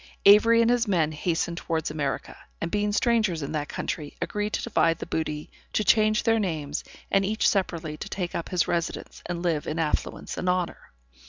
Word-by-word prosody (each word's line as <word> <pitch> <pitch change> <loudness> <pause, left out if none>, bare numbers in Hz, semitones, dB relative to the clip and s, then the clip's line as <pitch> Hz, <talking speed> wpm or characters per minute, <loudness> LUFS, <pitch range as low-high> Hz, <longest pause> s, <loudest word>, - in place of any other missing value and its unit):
Avery 230 +3 +7
and 230 - +3
his 245 -1 +2
men 165 -6 +2
hastened 170 +2 -1
towards 160 -3 -2
America, 145 -3 -3 0.2
and 165 - -3
being 210 0 +1
strangers 215 - +2
in 140 - -4
that 150 -2 -2
country, 150 -4 -4
agreed 210 0 -2
to - - -1
divide 165 -8 +2
the - - -6
booty, 150 -1 -3 0.2
to 215 - +2
change 215 +1 +4
their 225 -1 +3
names, 160 -8 -2 0.3
and 195 - +4
each 215 +3 +1
separately 170 -6 0
to - - -7
take 180 -3 -3
up 170 - -3
his 180 -2 +1
residence, 170 -1 -3
and 175 0 -3
live 165 -4 0
in 155 - -2
affluence 160 -2 -2
and 180 - 0
honor. 180 -1 -1
175 Hz, 190 wpm, -26 LUFS, 160-210 Hz, 0.3 s, Avery